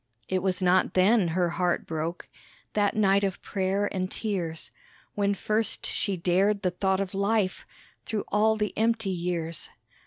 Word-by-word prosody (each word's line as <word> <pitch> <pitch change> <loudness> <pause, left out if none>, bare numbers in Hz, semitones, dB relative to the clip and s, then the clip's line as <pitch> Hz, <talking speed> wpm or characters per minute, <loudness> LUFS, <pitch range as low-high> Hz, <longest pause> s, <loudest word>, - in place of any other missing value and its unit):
It 185 -1 0
was 190 0 0
not 185 +1 +3
then 195 +1 +4
her 175 +1 +1
heart 175 0 0
broke 165 +2 -4 0.5
That 205 -1 +1
night 200 -1 +3
of 195 -2 -1
prayer 195 +1 0
and 185 -1 -2
tears 180 -8 -3 0.4
When 200 -1 +1
first 215 +3 0
she 200 -3 -1
dared 195 +4 +2
the 180 - +1
thought 190 +1 0
of 195 -1 -3
life 200 0 0 0.4
Through 215 -2 -2
all 220 +1 +3
the 210 -1 -2
empty 225 -2 +1
years. 170 -2 -3
190 Hz, 155 wpm, -27 LUFS, 180-205 Hz, 0.5 s, then